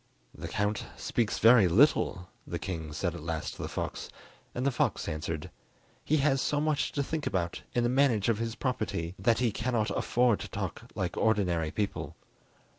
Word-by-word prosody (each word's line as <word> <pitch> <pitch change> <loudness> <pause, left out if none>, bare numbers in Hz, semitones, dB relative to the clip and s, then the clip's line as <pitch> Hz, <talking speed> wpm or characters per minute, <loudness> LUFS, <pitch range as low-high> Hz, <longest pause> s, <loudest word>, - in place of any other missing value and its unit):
"The - - -7
Count 105 +1 -1
speaks 115 -3 -1
very 115 -4 +7
little," 90 - +3 0.2
the - - -3
king 80 -5 -5
said 85 +3 -2
at 85 - -7
last 80 0 -3
to - - -9
the - - -3
fox, - - -4 0.5
and 125 - -1
the 140 - +3
fox 125 - 0
answered: 75 0 -4 0.5
"He 155 - +2
has 135 -2 +2
so 145 - +1
much 150 -1 0
to 140 - 0
think 155 +2 -3
about 85 -3 -1
in 120 - +3
the 120 - +2
management 125 -6 +3
of 110 -2 +1
his 115 0 -2
property 110 -10 -2
that 115 +4 +3
he 120 -3 +2
cannot 115 0 -1
afford 120 -3 +2
to - - -6
talk - - -5
like - - -2
ordinary 90 -7 +2
people." 100 +5 -3
110 Hz, 185 wpm, -30 LUFS, 90-125 Hz, 0.5 s, very